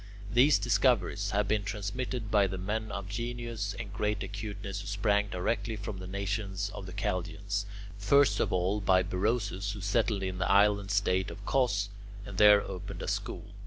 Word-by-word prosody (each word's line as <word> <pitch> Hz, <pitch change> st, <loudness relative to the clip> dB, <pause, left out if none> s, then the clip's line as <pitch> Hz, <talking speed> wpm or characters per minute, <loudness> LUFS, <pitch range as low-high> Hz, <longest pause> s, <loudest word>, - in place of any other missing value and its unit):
These 135 Hz, +5 st, +6 dB
discoveries 105 Hz, -3 st, +2 dB
have 100 Hz, 0 st, +1 dB
been 105 Hz, 0 st, +1 dB
transmitted 110 Hz, +4 st, -4 dB
by 100 Hz, -2 st, +4 dB
the 95 Hz, 0 st, -4 dB
men 110 Hz, +3 st, -3 dB
of 100 Hz, -1 st, -5 dB
genius 115 Hz, -1 st, -4 dB
and 110 Hz, -4 st, -6 dB
great 105 Hz, 0 st, -1 dB
acuteness 100 Hz, -1 st, -5 dB
who -, -, -9 dB
sprang 105 Hz, 0 st, +1 dB
directly 105 Hz, +4 st, -1 dB
from 105 Hz, -2 st, -6 dB
the 95 Hz, -, -7 dB
nation 100 Hz, +1 st, -3 dB, 0.2 s
of 95 Hz, -, -7 dB
the -, -, -8 dB
Chaldeans; 100 Hz, +1 st, -2 dB, 0.3 s
first 140 Hz, +7 st, +4 dB
of -, -, +1 dB
all, 95 Hz, +3 st, +1 dB
by 95 Hz, -1 st, +4 dB
Berosus, 100 Hz, +1 st, -1 dB
who 105 Hz, -, -7 dB
settled 100 Hz, 0 st, +1 dB
in 95 Hz, -1 st, -3 dB
the 95 Hz, -, 0 dB
island 100 Hz, 0 st, +4 dB
state 95 Hz, -2 st, +1 dB
of -, -, -9 dB
Cos, 105 Hz, -7 st, +1 dB, 0.4 s
and 100 Hz, -2 st, -6 dB
there 105 Hz, -1 st, +8 dB
opened 95 Hz, -2 st, -6 dB
a -, -, -5 dB
school. -, -, -4 dB
100 Hz, 175 wpm, -30 LUFS, 95-110 Hz, 0.4 s, there